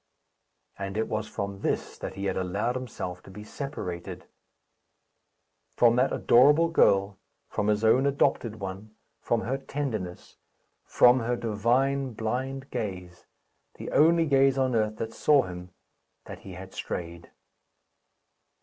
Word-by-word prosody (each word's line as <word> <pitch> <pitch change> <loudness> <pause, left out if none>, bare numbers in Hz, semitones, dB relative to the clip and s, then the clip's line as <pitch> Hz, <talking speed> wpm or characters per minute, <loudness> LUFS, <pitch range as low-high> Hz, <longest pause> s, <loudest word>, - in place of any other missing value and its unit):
And 100 +1 -4
it 110 - 0
was 110 0 -3
from 100 -2 -5
this - - -2
that - - -6
he 100 - -4
had - - -1
allowed 95 +6 -1
himself 100 -8 -5
to - - -15
be 105 +2 -10
separated 105 -9 -6 1.5
from 120 -1 +5
that 130 +2 +3
adorable 145 +7 +5
girl, 100 -10 +3 0.3
from 105 - -2
his 105 +1 +1
own 125 +5 +4
adopted 115 -5 0
one, 100 +3 -7 0.2
from 115 -1 0
her 130 +4 -2
tenderness, 115 -11 -5 0.5
from 125 +1 +5
her 120 +1 -1
divine 125 +4 0
blind 130 +5 -4
gaze, 90 -4 -6 0.5
the - - -7
only 165 +2 +4
gaze 135 -2 +3
on 130 -1 +1
earth 110 -1 0
that 115 +1 -5
saw 145 -3 +4
him, 90 0 -8 0.6
that - - -9
he 95 - -11
had 95 +1 -10
strayed! 85 -1 -6
110 Hz, 135 wpm, -27 LUFS, 95-130 Hz, 1.5 s, from